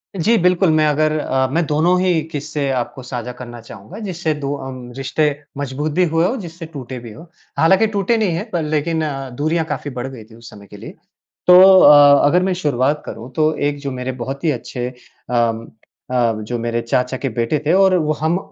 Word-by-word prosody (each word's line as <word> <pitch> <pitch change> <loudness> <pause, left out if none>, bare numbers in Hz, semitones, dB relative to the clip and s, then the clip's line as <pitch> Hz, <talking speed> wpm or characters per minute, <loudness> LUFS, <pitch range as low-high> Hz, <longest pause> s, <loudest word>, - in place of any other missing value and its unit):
जी। 220 +6 +2
बिल्कुल, 180 +1 +3
मैं 155 0 +3
अगर 155 +1 +1
अ, 130 -2 0
मैं 165 +2 +1
दोनों 165 +5 +2
ही 180 -4 +2
किस्से 145 -1 -3
आपको 130 +1 -4
साझा 125 -1 -5
करना 120 -1 -9
चाहूँगा। 115 - -11
जिससे 175 -6 -2
दो 140 +1 -1
अम 125 -2 -9
रिश्ते 135 +3 0 0.3
मजबूत 145 +2 -3
भी 180 +5 +2
हुए 165 +1 +3
हो, 240 - 0
जिससे 170 -4 -8
टूटे 130 -5 -8
भी 115 -2 -10
हो। 160 +10 -14 0.3
हालाँकि 190 +7 +4
टूटे 200 +4 +1
नहीं 195 -7 0
है 200 - -2
पर 170 - 0
लेकिन 155 +2 -1 0.4
दूरियाँ 160 +2 0
काफ़ी 145 - -5
बढ़ 125 +2 -3
गई 125 -5 -10
थी 110 +1 -18
उस 115 -1 -13
समय 100 -1 -14
के - - -12
लिए। - - -10 0.5
तो 180 - +8 0.3
अ, 145 -1 +7
अगर 180 +5 +3
मैं 185 -1 0
शुरुआत 140 +2 +1
करूँ 120 +3 -8
तो 155 0 +2 0.2
एक 145 - -4
जो 140 -1 -4
मेरे 125 0 -4
बहुत 135 +3 -6
ही 160 - +3
अच्छे 125 -2 -4 0.4
अम 115 -1 0 0.5
अ, - - -3 0.3
जो 120 +3 -4
मेरे 115 0 -2
चाचा 125 +2 -1
के 135 - -3
बेटे 115 +6 +1
थे 160 - +3
और 190 -1 +4
वो 155 -1 0
हम 160 +3 +1
150 Hz, 205 wpm, -18 LUFS, 125-165 Hz, 0.5 s, तो